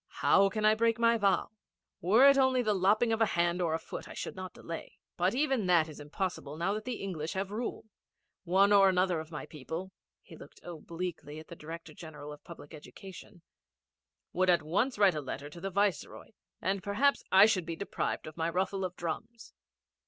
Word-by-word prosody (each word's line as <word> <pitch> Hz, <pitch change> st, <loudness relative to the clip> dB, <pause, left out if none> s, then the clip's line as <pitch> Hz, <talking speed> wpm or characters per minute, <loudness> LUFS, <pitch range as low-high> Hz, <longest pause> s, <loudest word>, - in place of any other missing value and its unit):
How 195 Hz, 0 st, +5 dB
can 215 Hz, +2 st, -2 dB
I 215 Hz, -, +6 dB
break 230 Hz, +1 st, +1 dB
my 235 Hz, 0 st, +4 dB
vow? 200 Hz, -1 st, +1 dB, 0.5 s
Were 220 Hz, +10 st, +6 dB
it 280 Hz, -, +7 dB
only 260 Hz, -2 st, +3 dB
the 215 Hz, -2 st, +2 dB
lopping 210 Hz, +4 st, +2 dB
of 225 Hz, -, -1 dB
a 225 Hz, -, +5 dB
hand 170 Hz, +1 st, +1 dB
or 165 Hz, -2 st, +1 dB
a -, -, -3 dB
foot -, -, -8 dB
I -, -, -10 dB
should -, -, -5 dB
not 185 Hz, -1 st, -7 dB
delay. 165 Hz, -1 st, -8 dB, 0.2 s
But 180 Hz, +5 st, +1 dB
even 265 Hz, -7 st, +1 dB
that 170 Hz, -3 st, +4 dB
is 155 Hz, -, -11 dB
impossible 150 Hz, -1 st, -4 dB
now 175 Hz, +4 st, 0 dB
that 215 Hz, +1 st, -5 dB
the 250 Hz, -4 st, -4 dB
English 165 Hz, -5 st, -4 dB
have 190 Hz, +1 st, -3 dB
rule. 225 Hz, +2 st, -4 dB, 0.6 s
One 195 Hz, +3 st, +4 dB
or 195 Hz, -1 st, +7 dB
another 180 Hz, -2 st, +1 dB
of 155 Hz, 0 st, -8 dB
my 150 Hz, -4 st, -6 dB
people' 165 Hz, +5 st, -7 dB, 0.3 s
he -, -, -13 dB
looked -, -, -14 dB
obliquely 165 Hz, -2 st, -6 dB
at 155 Hz, -, -11 dB
the 170 Hz, -, -8 dB
Director 165 Hz, 0 st, -9 dB
General 150 Hz, -2 st, -9 dB
of 150 Hz, -, -14 dB
Public 170 Hz, -2 st, -12 dB
Education 175 Hz, +3 st, -12 dB, 0.9 s
'would 185 Hz, 0 st, +2 dB
at 175 Hz, -3 st, +4 dB
once 205 Hz, -, 0 dB
write 200 Hz, -3 st, +5 dB
a 150 Hz, -, -3 dB
letter 140 Hz, +1 st, -7 dB
to 170 Hz, -, -11 dB
the 195 Hz, -, -3 dB
Viceroy, 200 Hz, -3 st, -1 dB, 0.3 s
and 190 Hz, +1 st, -1 dB
perhaps 215 Hz, +8 st, +1 dB
I 195 Hz, +2 st, +8 dB
should 185 Hz, -6 st, +1 dB
be 165 Hz, -, -3 dB
deprived 200 Hz, -, -3 dB
of 155 Hz, -, -9 dB
my 165 Hz, 0 st, -1 dB
ruffle 190 Hz, +2 st, -1 dB
of 180 Hz, -1 st, -4 dB
drums.' 225 Hz, +8 st, -6 dB
185 Hz, 205 wpm, -31 LUFS, 165-205 Hz, 0.9 s, I